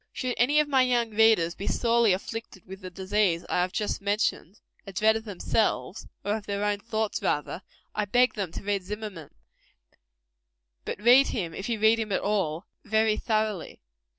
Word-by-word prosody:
Should 255 -2 -3
any 285 +6 +4
of 300 - +2
my 270 -2 +3
young 240 -3 +1
readers 215 -6 +4
be 195 - -7
sorely 235 -2 +3
afflicted 190 0 -5
with 190 +1 -10
the 185 - -7
disease 190 -1 0
I - - +1
have 180 +1 -1
just 210 0 -2
mentioned 205 -1 -1 0.3
a - - -6
dread 215 +4 +3
of 220 0 -4
themselves, 205 0 -1 0.2
or 205 +1 +1
of 210 - -11
their 200 0 -1
own 205 -1 0
thoughts, 220 0 -2
rather 150 +4 -1 0.3
I 210 - -1
beg 245 +5 +3
them 195 -6 -4
to - - -7
read 200 -1 -1
Zimmerman. 200 -4 -7 1.6
But - - -4
read 245 +5 +6
him, 175 -8 -3
if 195 +7 -5
you 230 -2 -1
read 220 +1 +4
him 215 -2 -3
at - - 0
all, 190 -4 -1 0.2
very 220 0 +2
thoroughly. 215 -5 -2
210 Hz, 180 wpm, -27 LUFS, 195-225 Hz, 1.6 s, read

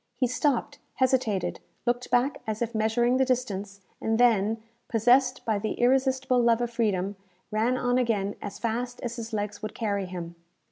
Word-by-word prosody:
He 255 - +1
stopped, 250 +1 0 0.2
hesitated, 255 -7 +1 0.3
looked 245 0 0
back 250 +3 +2
as 220 +1 -1
if 235 0 -4
measuring 235 +3 +2
the 265 - +4
distance, 205 -6 -2 0.2
and 220 0 +1
then, 225 -3 +4 0.3
possessed 250 +3 +3
by 215 -3 +1
the 215 +1 -2
irresistible 260 0 +2
love 235 -1 +4
of 240 -1 -2
freedom, 205 -4 0 0.3
ran 225 +4 +1
on 245 0 +1
again 205 -5 0
as 200 -1 -6
fast 245 +2 -2
as 240 0 -4
his 230 0 -6
legs 210 -1 -3
would 215 - -5
carry 200 -4 -1
him. 175 -2 -6
235 Hz, 170 wpm, -27 LUFS, 210-250 Hz, 0.3 s, the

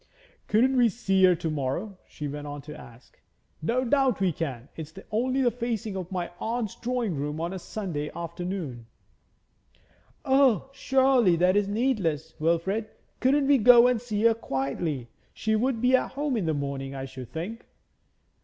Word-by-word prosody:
'Couldn't 255 +5 +3
we 240 -2 +5
see 195 -3 +1
her 180 -1 +5
to 165 0 -4
morrow?' 155 +8 -3
she 150 - -6
went 145 +1 -6
on 145 0 -6
to 150 +2 -9
ask. 120 +1 -15 0.4
'No 245 +10 0
doubt 265 -2 +2
we 190 -2 +2
can. 135 -6 -5
It's 155 -1 -7 0.2
only 255 +5 +1
the 240 - +3
facing 230 -3 -3
of 185 -1 -5
my 175 -2 -3
aunt's 225 -2 -2
drawing 240 -6 -2
room 150 +2 -3
on 170 +3 -2
a 190 - -5
Sunday 170 -7 -4
afternoon.' 170 -8 -5 1.4
'O, 265 -3 +3
surely 265 -9 +3
that 180 +3 +3
is 205 -1 +2
needless, 205 - -1
Wilfrid? 170 +7 0 0.3
Couldn't 275 +2 +3
we 280 -1 +5
go 240 +1 +8
and 250 -2 +2
see 215 -3 -2
her 230 0 +6
quietly? 135 - -3 0.3
She 220 0 0
would 240 +2 0
be 250 +2 +4
at - - -1
home 285 -1 -1
in 200 -7 -1
the 160 - +1
morning, 140 -1 -4
I 135 0 -4
should 130 -2 -9
think.' 195 +9 -5
195 Hz, 170 wpm, -27 LUFS, 155-240 Hz, 1.4 s, go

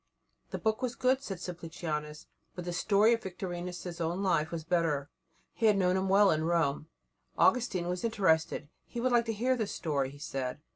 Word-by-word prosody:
The - - -4
book 220 +2 0
was 250 -2 -2
good, 260 +1 +2
said 195 -9 -5
Simplicianus, 160 -3 -5 0.3
but 180 - -6
the 175 - -3
story 210 +5 +4
of 230 - -1
Victorinus' 180 -2 -5
own 170 +4 -1
life 160 -5 +2
was 165 -2 -4
better. 160 -4 0 0.4
He 225 - +2
had 210 -2 +5
known 180 -1 +3
him 190 0 0
well 200 +1 +6
in 155 0 +1
Rome. 160 -3 +1 0.5
Augustine 210 -8 +3
was 180 0 -2
interested; 160 -9 +1 0.2
he 240 - -6
would 255 +2 +1
like 240 -1 +4
to 225 - -1
hear 250 +5 +1
the 220 -4 -1
story, 145 -8 -1
he 140 - -12
said. 135 -2 -4
180 Hz, 190 wpm, -31 LUFS, 160-210 Hz, 0.5 s, well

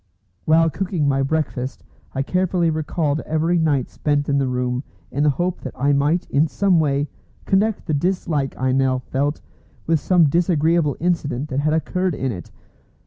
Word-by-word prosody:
While 165 +1 +4
cooking 180 -5 -1
my 135 -1 +2
breakfast, 135 -3 -2 0.3
I 135 - 0
carefully 180 0 +1
recalled 155 -1 -1
every 160 +3 0
night 145 -6 +1
spent 145 -1 -1
in 140 0 +2
the 135 - +1
room, 125 0 -1 0.3
in 145 - -1
the 150 - +4
hope 175 +5 -1
that 130 - -7
I 140 +2 +3
might 145 +5 +1
in 150 +3 +3
some 185 +1 +2
way 145 -1 +1 0.4
connect 205 +2 +1
the 155 - -1
dislike 155 -3 -1
I 130 0 0
now 130 0 +2
felt 140 +3 -2 0.4
with 165 -1 +2
some 170 +1 +4
disagreeable 165 -2 +2
incident 150 -5 -1
that 130 - -1
had 155 +1 +1
occurred 180 +2 0
in 130 -1 -2
it. 90 -6 -8
150 Hz, 170 wpm, -21 LUFS, 140-170 Hz, 0.4 s, While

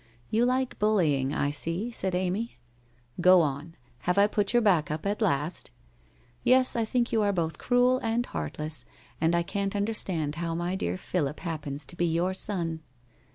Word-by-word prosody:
' 120 - -32
You 230 +2 +3
like 255 0 0
bullying, 160 -11 +2
I 145 -1 0
see,' 165 +10 -3
said 190 -5 -2
Amv. 185 +6 -1 0.3
' 120 +3 -13
Go 185 0 +7
on. 150 +2 -3 0.2
Have 180 +9 -1
I 200 - +7
put 205 -1 0
your 240 - +4
back 180 -8 +3
up 155 +3 -4
at 205 +3 -1
last? 160 -4 0 0.3
' - - -34
* - - -32 0.2
Yes, 255 0 +4
I 230 -1 +1
think 240 +1 0
you 220 - +2
are 205 -1 +2
both 165 -5 -2
cruel 250 +1 +3
and 230 +1 0
heartless, 150 - -4 0.4
and 165 +1 +3
I 170 - +2
can't 200 +3 -2
understand 195 -7 +1
how 165 -1 -2
my 175 +2 -2
dear 90 - -2
Philip 150 - -2
happens 150 -4 -4
to - - -6
be 175 0 +1
your 170 +3 0
son.' 175 -5 -1
175 Hz, 195 wpm, -28 LUFS, 150-210 Hz, 0.4 s, Go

